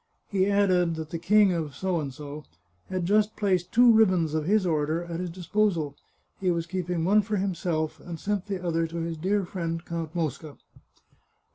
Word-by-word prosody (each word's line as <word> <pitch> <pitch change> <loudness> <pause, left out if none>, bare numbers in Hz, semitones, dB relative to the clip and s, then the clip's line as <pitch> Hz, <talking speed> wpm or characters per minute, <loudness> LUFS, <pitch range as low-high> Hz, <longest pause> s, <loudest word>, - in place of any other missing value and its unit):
He 195 -1 +2
added 185 -4 +3
that 160 -1 -6
the 165 - -3
King 200 +2 +4
of 160 -4 -3 1.2
had 185 -2 -2
just 210 +3 +2
placed 190 -4 0
two 240 0 +7
ribbons 185 -8 +3
of 155 -1 -1
his 205 +2 +2
Order 160 0 0
at 170 -1 -5
his 180 0 -3
disposal; 175 -4 0 0.4
he 185 - 0
was 170 -1 0
keeping 175 -1 -2
one 205 +3 +5
for 210 +1 -2
himself, 170 -5 -2
and 170 -2 -8
sent 205 +1 -2
the 190 -3 -4
other 165 -1 +1
to 165 +1 -7
his 165 0 -3
dear 190 +5 0
friend 170 -2 -4
Count 165 -1 -5
Mosca. 155 -2 -3
175 Hz, 170 wpm, -27 LUFS, 165-200 Hz, 1.2 s, two